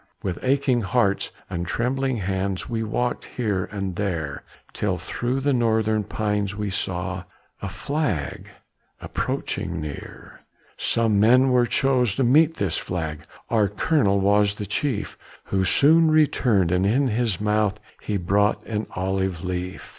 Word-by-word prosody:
With 90 Hz, -3 st, -3 dB
aching 130 Hz, -2 st, +2 dB
hearts 100 Hz, -1 st, +1 dB, 0.2 s
and 85 Hz, -1 st, -4 dB
trembling 130 Hz, +4 st, 0 dB
hands, 95 Hz, -2 st, -2 dB
We 115 Hz, -1 st, -2 dB
walkèd 120 Hz, +3 st, -1 dB
here 105 Hz, -7 st, 0 dB
and 95 Hz, -3 st, -4 dB
there, 85 Hz, -8 st, -2 dB, 0.3 s
Till 95 Hz, -3 st, -1 dB
through 120 Hz, +9 st, -2 dB
the 140 Hz, +1 st, +2 dB
northern 110 Hz, -3 st, +1 dB
pines 105 Hz, -1 st, -1 dB
we 105 Hz, -1 st, -3 dB
saw 95 Hz, 0 st, -3 dB, 0.4 s
A 100 Hz, -, -3 dB
flag 140 Hz, -, -2 dB, 0.5 s
approaching 85 Hz, -, -3 dB
near. 75 Hz, -2 st, -8 dB, 0.4 s
Some 115 Hz, -3 st, +1 dB
men 125 Hz, +5 st, +5 dB
were 125 Hz, -1 st, +4 dB
chose 125 Hz, -5 st, +2 dB
to 135 Hz, -, +1 dB
meet 155 Hz, +6 st, +4 dB
this 95 Hz, -, -1 dB
flag, 80 Hz, -3 st, -4 dB, 0.3 s
Our 110 Hz, -3 st, +3 dB
colonel 105 Hz, -, +2 dB
was 100 Hz, +1 st, +3 dB
the 105 Hz, -, -5 dB
chief, 110 Hz, +2 st, -2 dB, 0.3 s
Who 95 Hz, -1 st, +1 dB
soon 160 Hz, -, +5 dB
returned 125 Hz, -, +3 dB
and 90 Hz, +2 st, +2 dB
in 130 Hz, +5 st, +2 dB
his 110 Hz, -4 st, 0 dB
mouth 105 Hz, -1 st, +1 dB, 0.2 s
He 105 Hz, -, -2 dB
brought 100 Hz, +4 st, +1 dB
an 110 Hz, -1 st, -3 dB
olive 95 Hz, -1 st, -1 dB
leaf. 90 Hz, 0 st, -4 dB
105 Hz, 140 wpm, -24 LUFS, 95-125 Hz, 0.5 s, men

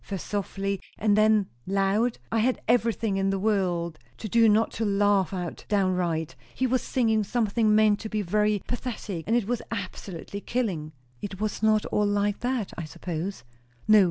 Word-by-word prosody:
first 195 Hz, -4 st, -5 dB
softly 195 Hz, -1 st, -2 dB, 0.2 s
and 210 Hz, -2 st, +3 dB
then 215 Hz, -1 st, +4 dB, 0.2 s
loud? 195 Hz, +5 st, +1 dB
I 225 Hz, -, +2 dB
had 250 Hz, +3 st, +2 dB
everything 225 Hz, -3 st, +2 dB
in 195 Hz, 0 st, +1 dB
the 195 Hz, -, 0 dB
world 180 Hz, -5 st, 0 dB, 0.2 s
to 220 Hz, -, -5 dB
do 225 Hz, +2 st, +5 dB
not 215 Hz, +2 st, +3 dB
to 225 Hz, -, -2 dB
laugh 200 Hz, -2 st, +2 dB
out 180 Hz, -3 st, -5 dB
downright. 180 Hz, -5 st, 0 dB, 0.2 s
He 260 Hz, -, 0 dB
was 255 Hz, 0 st, +1 dB
singing 220 Hz, -4 st, +1 dB
something 215 Hz, 0 st, +2 dB
meant 215 Hz, -1 st, +4 dB
to 220 Hz, -, -6 dB
be 215 Hz, -1 st, -1 dB
very 210 Hz, +2 st, +1 dB
pathetic; 220 Hz, -8 st, -4 dB
and 225 Hz, -, +2 dB
it 240 Hz, -4 st, +2 dB
was 245 Hz, 0 st, -1 dB
absolutely 200 Hz, -2 st, -6 dB
killing." 190 Hz, -13 st, -2 dB, 0.3 s
"It 195 Hz, -2 st, -6 dB
was 215 Hz, -1 st, -2 dB
not 215 Hz, -1 st, +3 dB
all 210 Hz, 0 st, +1 dB
like 205 Hz, 0 st, 0 dB
that, 245 Hz, -4 st, -2 dB
I 170 Hz, -, -5 dB
suppose?" 175 Hz, +4 st, -5 dB, 0.4 s
"No. 215 Hz, 0 st, +8 dB
205 Hz, 175 wpm, -26 LUFS, 195-220 Hz, 0.4 s, No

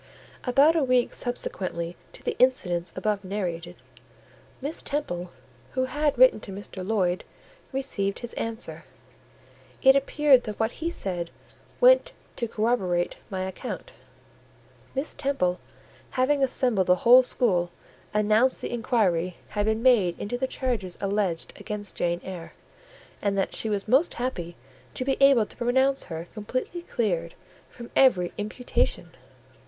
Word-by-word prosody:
About 275 Hz, +6 st, +5 dB
a 320 Hz, -, +3 dB
week 255 Hz, -2 st, +2 dB
subsequently 180 Hz, -8 st, -3 dB, 0.2 s
to -, -, -13 dB
the 475 Hz, -, -2 dB
incidents 180 Hz, -9 st, +2 dB
above 205 Hz, +1 st, -1 dB
narrated, 180 Hz, -3 st, -4 dB, 0.8 s
Miss 290 Hz, +4 st, -4 dB
Temple, 180 Hz, -12 st, -3 dB, 0.4 s
who 260 Hz, 0 st, +1 dB
had 295 Hz, +2 st, 0 dB
written -, -, +6 dB
to -, -, -9 dB
Mr. 195 Hz, -1 st, -7 dB
Lloyd, 185 Hz, -3 st, 0 dB, 0.5 s
received 220 Hz, -8 st, -2 dB
his 240 Hz, -, -6 dB
answer: 225 Hz, +1 st, -4 dB, 1.0 s
it 265 Hz, 0 st, +8 dB
appeared 275 Hz, -2 st, +4 dB
that 215 Hz, -2 st, -6 dB
what 225 Hz, +1 st, +1 dB
he 335 Hz, -, 0 dB
said 180 Hz, -, -3 dB, 0.5 s
went -, -, +6 dB, 0.2 s
to 235 Hz, -, -1 dB
corroborate 210 Hz, -6 st, 0 dB
my 190 Hz, -1 st, -3 dB
account. 190 Hz, -, -6 dB, 1.0 s
Miss 270 Hz, +3 st, -2 dB
Temple, 270 Hz, -11 st, 0 dB, 0.5 s
having 275 Hz, +2 st, +2 dB
assembled 250 Hz, -7 st, +1 dB
the 180 Hz, -, +6 dB
whole 250 Hz, +2 st, +9 dB
school, 195 Hz, -9 st, +1 dB, 0.4 s
announced 215 Hz, +4 st, +3 dB
that -, -, -4 dB
inquiry 190 Hz, -7 st, +1 dB
had 205 Hz, 0 st, -1 dB
been 220 Hz, +1 st, 0 dB
made 210 Hz, -10 st, +4 dB
into 210 Hz, +4 st, -3 dB
the 260 Hz, +2 st, -1 dB
charges 235 Hz, -10 st, -3 dB
alleged 195 Hz, -4 st, -1 dB
against 205 Hz, -1 st, -6 dB
Jane 175 Hz, 0 st, 0 dB
Eyre, 180 Hz, -3 st, -8 dB, 0.7 s
and 200 Hz, -1 st, 0 dB
that 195 Hz, -, 0 dB
she 220 Hz, -, -1 dB
was 205 Hz, -1 st, -2 dB
most 270 Hz, +10 st, +3 dB
happy 175 Hz, -9 st, -3 dB, 0.4 s
to 255 Hz, -, -2 dB
be 270 Hz, 0 st, +2 dB
able 275 Hz, -5 st, +6 dB
to -, -, -14 dB
pronounce 265 Hz, +3 st, +2 dB
her 165 Hz, 0 st, -6 dB
completely 255 Hz, +10 st, -4 dB
cleared 175 Hz, -, -2 dB, 0.3 s
from 235 Hz, -1 st, -11 dB
every 185 Hz, -10 st, +4 dB
imputation. 215 Hz, +4 st, -1 dB
220 Hz, 140 wpm, -26 LUFS, 185-260 Hz, 1.0 s, whole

